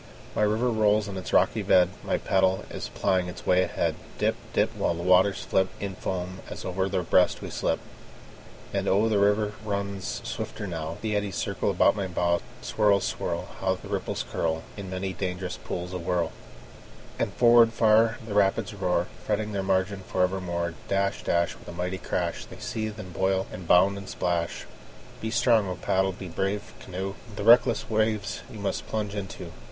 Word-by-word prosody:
The 105 - +2
river 115 +4 +1
rolls 105 -1 +3
in 100 - -6
its 95 - -5
rocky - - +3
bed; 90 -1 +5
My - - 0
paddle 95 0 +2
is - - -5
plying 95 -2 +1
its 90 - -8
way 90 0 +4
ahead; - - 0 0.2
Dip, - - +2 0.2
dip, - - +1
While 85 - 0
the 85 - -5
waters 95 +2 +4
flip 95 0 +2
In 100 0 -3
foam 90 0 -4
as - - -7
over 95 +1 -1
their 95 -2 0
breast 90 +2 +3
we - - -6
slip. - - 0 0.9
And - - -1
oh, 100 +4 +4
the 105 -2 +2
river 105 +1 +3
runs 100 -2 -3
swifter - - -4
now; 80 -3 -4
The 110 -2 -1
eddies 100 -2 -1
circle - - -1
about - - +4
my 100 -2 -2
bow. 85 -1 +1 0.2
Swirl, 105 -2 +3
swirl! - - -3
How 95 0 +1
the - - -11
ripples - - -2
curl 80 -1 -1
In 100 -2 -7
many 95 +1 -3
a - - -7
dangerous 90 -1 -3
pool 90 0 -4
awhirl! 85 -2 -1 0.9
And - - 0
forward 120 -1 +6
far 115 0 +4
the 110 - -5
rapids 105 +2 +2
roar, 90 -3 0 0.2
Fretting 105 0 -1
their 100 -1 -1
margin 95 +1 +1
for 90 - +1
evermore. 90 -2 -1
Dash, 100 0 0
dash, 85 0 +1
With - - -17
a 85 - -7
mighty 90 +2 -3
crash, 85 -1 -2
They - - -11
seethe, 110 -1 -4
and 95 -4 -8
boil, 95 +2 +1
and 90 -2 -8
bound, 95 +3 +5
and 100 - -9
splash. 85 -2 -1 0.6
Be 110 - -2
strong, 115 -2 +3
O 90 - -2
paddle! 95 +2 +1
be 95 +1 -8
brave, 95 +4 -2
canoe! 95 +1 -5 0.2
The - - -4
reckless 120 +1 +5
waves 110 -1 0
you 110 - -9
must 100 -1 -3
plunge 105 -2 -2
into. 100 -2 -6
95 Hz, 185 wpm, -27 LUFS, 90-105 Hz, 0.9 s, forward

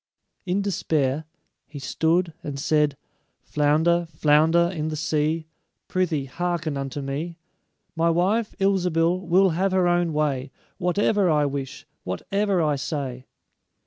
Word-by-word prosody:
In 190 +3 0
despair, 155 -6 0 0.4
he 150 - -10
stood 165 +4 0
and 140 -2 -5
said; 150 -1 +1 0.5
"Flounder, 160 +4 +2
flounder 160 +2 +3
in 155 -3 -2
the 155 - -3
sea, 155 +1 0 0.4
Prythee, 165 -7 0
hearken 165 +1 -2
unto 135 +1 -4
me: 155 +5 -4 0.6
My 165 +1 +2
wife, 195 +7 +1
Ilsebil, 180 -3 +2
will 185 +2 +4
have 185 +4 0
her 185 -1 +3
own 175 -1 +2
way 145 -4 -1 0.3
Whatever 195 +2 +2
I 150 -2 +3
wish, 140 -2 -5 0.2
whatever 195 - 0
I 150 -2 +1
say." 130 -2 -4
160 Hz, 125 wpm, -24 LUFS, 145-175 Hz, 0.6 s, will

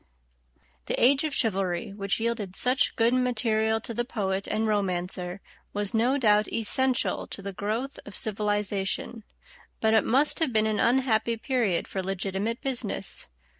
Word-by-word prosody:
The - - 0
age 270 +4 +5
of 295 -3 -2
chivalry, 195 -2 0
which 200 0 -1
yielded 225 -5 -2
such 255 +5 +1
good 230 +1 +3
material 225 -3 +1
to 230 - -6
the 240 - -1
poet 195 -5 -2
and 215 +1 0
romancer, 185 -2 -2 0.3
was 205 -1 -1
no 240 +5 +2
doubt 210 -5 +3
essential 255 +3 +1
to - - -8
the 200 0 -5
growth 225 +9 -3
of 205 - -9
civilization, 205 +1 -1 0.6
but 220 0 +2
it 220 - +4
must 275 +5 +2
have 320 -6 +1
been 215 -1 +2
an 215 -1 0
unhappy 235 -2 +2
period 225 -7 0
for 190 - -3
legitimate 195 +4 -3
business. 250 - 0
220 Hz, 150 wpm, -27 LUFS, 200-240 Hz, 0.6 s, age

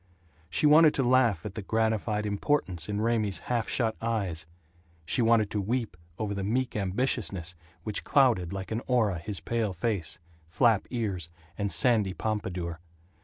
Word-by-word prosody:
She 90 - +1
wanted 155 +1 +7
to 135 - +1
laugh 120 -8 +3
at 105 - -5
the 110 - -5
gratified 110 0 0
importance 100 - -1
in 105 0 -1
Raymie's 110 -4 +1 0.2
half 115 -2 0
shut 115 -3 0
eyes; 100 -9 -2 0.6
she 85 - +1
wanted 115 -3 +3
to 105 - -1
weep 115 +3 -2 0.2
over 105 -2 -2
the 100 -1 -3
meek 125 +6 0
ambitiousness 100 -3 -1 0.3
which 105 0 -3
clouded 120 -11 +3
like 95 +1 -6
an 110 +2 -1
aura 110 -8 +2
his 100 +2 -5
pale 115 -4 -1
face, 95 -2 -2 0.3
flap 110 +5 +2
ears, 100 -9 -3 0.3
and 100 +1 -2
sandy 110 -8 +3
pompadour. 90 -6 -3
105 Hz, 155 wpm, -28 LUFS, 95-115 Hz, 0.6 s, wanted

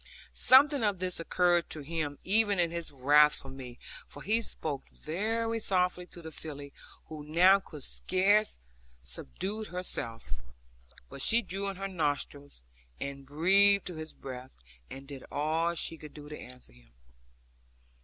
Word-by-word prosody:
Something 280 0 +6
of 205 -3 +2
this 180 -1 -3
occurred 175 0 +2
to 155 - -6
him 150 -1 -3
even 205 +1 +3
in 170 -2 +2
his 170 -2 -4
wrath 145 +2 +5
with 135 - -8
me, 125 -3 -9 0.3
for - - -9
he 220 +4 +2
spoke 150 -10 -5
very 225 +7 -2
softly 180 -3 0
to 170 - -12
the 160 - -6
filly, 145 -2 -5 0.3
who 155 -2 -8
now 180 +6 +6
could 150 -7 -10
scarce 205 +8 +2 0.5
subdue 190 - -4
herself; 115 - -4 0.8
but 135 - -9
she 235 - +3
drew 195 0 -3
in 195 - -5
her 195 +1 -3
nostrils, 145 - -3 0.4
and 140 -1 -6
breathed 195 +7 +5
to 180 - -3
his 155 0 -6
breath 130 -1 -8 0.4
and 135 +1 -9
did 135 -2 -8
all 160 +4 +1
she 165 -1 -3
could 150 -1 -11
to 150 0 -8
answer 125 - -10
him. - - -22
165 Hz, 150 wpm, -31 LUFS, 145-195 Hz, 0.8 s, Something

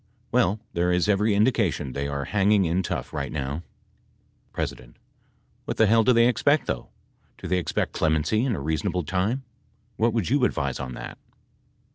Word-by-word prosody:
Well 110 -4 +2
there 90 +1 +1
is 90 +2 +2
every 105 +1 +2
indication 100 - +1
they 70 +2 -2
are 70 -1 -3
hanging 100 -1 +3
in 85 +3 +1
tough 90 - -4
light 70 -2 -3
now. 70 +1 -3 0.9
P. - - 0 1.0
What - - -4
the 110 - +5
hell 115 +2 +4
do 125 - +4
they 115 -1 +5
expect 145 +5 +2
though? 60 - -4 0.5
Do - - -7
they 90 - +1
expect 90 - -2
clemency 80 +8 +1
in 130 -5 0
a - - -4
reasonable 80 +4 -1
time? 95 - -1 0.5
What 115 +1 +2
would 115 -6 0
you 140 -1 +3
advise 70 - 0
on 65 -1 -5
that - - -8
95 Hz, 170 wpm, -25 LUFS, 75-110 Hz, 1.0 s, the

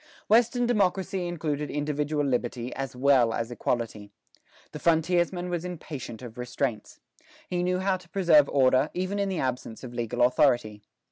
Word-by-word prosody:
Western 240 +3 +3
democracy 195 -5 0
included 150 -4 -3
individual 150 0 -1
liberty, 125 -2 -2
as 135 -2 -5
well 125 -3 +3
as 115 +1 -3
equality. 115 -4 -3 0.6
The - - -7
frontiersman 175 +2 +1
was 175 -1 -2
impatient 150 -9 -7
of 120 0 -9
restraints. 125 -1 -3 0.5
He 175 -1 -1
knew 180 +1 +1
how 190 0 0
to 180 -2 -19
preserve 165 -5 +4
order, 130 +1 +3
even 185 +3 -2
in 200 -1 0
the 190 - -2
absence 125 -4 -3
of 125 -2 -8
legal 120 0 -1
authority. 120 -4 +2
145 Hz, 150 wpm, -27 LUFS, 125-180 Hz, 0.6 s, preserve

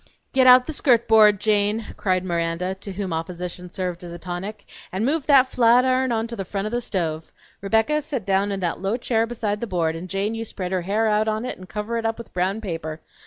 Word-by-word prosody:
"Get 260 -1 +4
out 250 0 +8
the 315 - -4
skirt 240 -5 +3
board, 215 -2 +6
Jane," 210 +1 +1
cried 185 -2 0
Miranda, 170 +1 -1
to 195 +1 -8
whom 190 -2 -3
opposition 180 +2 -5
served 180 -2 -4
as 175 - -8
a 170 - -7
tonic, 185 +4 -6 0.3
"and 190 +5 -1
move 300 +2 0
that 270 -3 +6
flat 245 +1 +5
iron 260 0 +2
on 225 -1 0
to 235 0 -6
the 195 - -4
front 195 +2 -4
o' 215 - -3
the 240 0 -1
stove. 165 -7 -3 0.3
Rebecca, 225 +10 +2
set 275 -8 -4
down 195 +1 +1
in 195 -1 -3
that 175 -1 -2
low 195 +4 0
chair 230 -2 0
beside 215 -3 -3
the 235 - -2
board, 165 -4 0
and 175 +3 -7
Jane, 195 +3 -1
you 225 0 -3
spread 190 -4 -5
out - - +2
her - - -2
hair 210 +5 0
on 215 +1 +1
it 255 - -5
and 185 - -12
cover 215 +3 -3
it 225 - -5
up 225 - -2
with 235 - -11
brown 190 +4 -1
paper. 165 -5 -5
205 Hz, 240 wpm, -23 LUFS, 180-230 Hz, 0.3 s, out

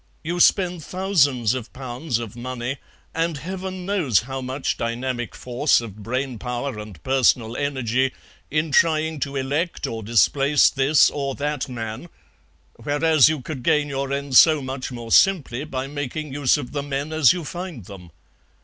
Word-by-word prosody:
You 175 +2 -3
spend 180 -2 +3
thousands 145 - +1
of 125 -2 -5
pounds 130 0 -3
of 115 -2 -7
money, 125 +2 -4 0.4
and 165 -1 -1
Heaven 185 +3 -6
knows 175 - +2
how 135 +3 -6
much 130 +2 -2
dynamic 120 +1 -3
force 125 +4 +1
of 110 -4 -8
brain 125 +2 -3
power 125 0 -4
and 105 -4 -9
personal 125 -3 +2
energy, 130 -2 0 0.4
in 155 +1 -1
trying 160 0 +2
to 140 0 -3
elect 145 +6 -2
or 115 -1 -4
displace 135 +6 +3
this 140 +2 +4
or 140 -2 -3
that 145 -2 -3
man, 115 +5 -6 0.7
whereas 145 +3 +3
you 155 -3 -2
could 135 0 -6
gain 145 +3 +2
your 135 0 -3
ends 140 -2 +4
so 155 -2 +6
much 130 -1 -5
more 120 -2 -7
simply 150 -8 +3
by 130 -3 -4
making 145 +1 -5
use 140 -1 +2
of 140 -4 -6
the 145 - -2
men 140 +2 -4
as 155 -5 +5
you 175 -1 -3
find 170 - -7
them. 90 -3 -11
135 Hz, 160 wpm, -23 LUFS, 125-155 Hz, 0.7 s, so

